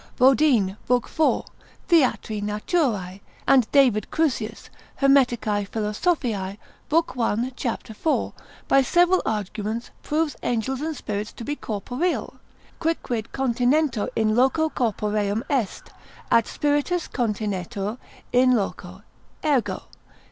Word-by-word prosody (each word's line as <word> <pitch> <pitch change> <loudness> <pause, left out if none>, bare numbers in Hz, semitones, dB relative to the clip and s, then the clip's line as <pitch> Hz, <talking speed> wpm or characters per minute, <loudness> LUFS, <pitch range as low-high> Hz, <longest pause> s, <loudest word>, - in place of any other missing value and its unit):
Bodine, 255 -7 +4
lib. 250 -1 +3
4, 315 -1 +1 0.4
Theatri 255 - +2
Naturae 210 - -1 0.3
and 260 -5 +4
David 255 -7 +4
Crusius, 240 -9 -1 0.3
Hermeticae 240 -7 +3
Philosophiae, 210 - -1 0.3
lib. 330 +2 +2
1. 235 +1 0
cap. 245 -2 -4
4, 225 +8 -1 0.3
by 275 - +5
several 350 +7 +3
arguments 215 +2 -3
proves 305 -2 -1
angels 245 +3 -1
and 315 -1 -3
spirits 210 +1 -4
to - - -9
be 290 +4 -2
corporeal: 245 - -3 0.4
quicquid 250 -9 -1
continetur 255 -1 +1
in 215 -1 +2
loco 270 +6 +3
corporeum 210 -3 -1
est; 250 -8 -2 0.4
At 230 -1 +4
spiritus 295 +4 0
continetur 210 -1 -2 0.3
in 250 0 +5
loco, 190 -2 -4 0.4
ergo. 280 -6 +1
240 Hz, 105 wpm, -24 LUFS, 210-285 Hz, 0.4 s, by